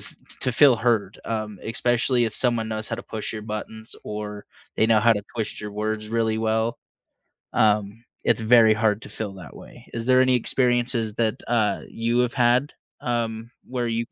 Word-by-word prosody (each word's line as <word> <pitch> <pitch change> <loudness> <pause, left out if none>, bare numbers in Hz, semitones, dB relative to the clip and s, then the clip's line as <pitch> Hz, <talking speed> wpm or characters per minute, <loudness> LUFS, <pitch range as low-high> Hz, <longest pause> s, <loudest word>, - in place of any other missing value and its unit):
f - - -8 0.3
to 130 - 0
feel 140 +1 +6
heard, 110 -4 0
um, 110 -3 -4
especially 120 +1 +1
if 110 - -5
someone 120 -3 +1
knows 110 0 -4
how - - -2
to - - -7
push 110 -1 -5
your 110 -1 -6
buttons 110 +1 -7
or 105 -1 -6 0.3
they - - +3
know 110 -1 +4
how 115 +1 +5
to 105 - -2
twist 110 -2 -3
your 105 0 -6
words 110 +1 -3
really 115 -1 0
well. 110 +1 0 0.7
Um, 105 +1 +1 0.2
it's 120 -2 +2
very 110 -1 +6
hard 110 -1 +1
to - - -9
feel 105 -3 -5
that 85 -8 -11
way. - - -14
Is 115 0 -3
there 130 0 +5
any 130 0 +4
experiences 120 -2 +1
that, 110 -1 0
uh, 110 -4 +1
you 115 +1 -1
have 125 -1 0
had, 125 +2 +2 0.3
um, 115 -1 -2
where 125 -1 -3
you 115 0 -1
115 Hz, 185 wpm, -24 LUFS, 110-120 Hz, 0.7 s, feel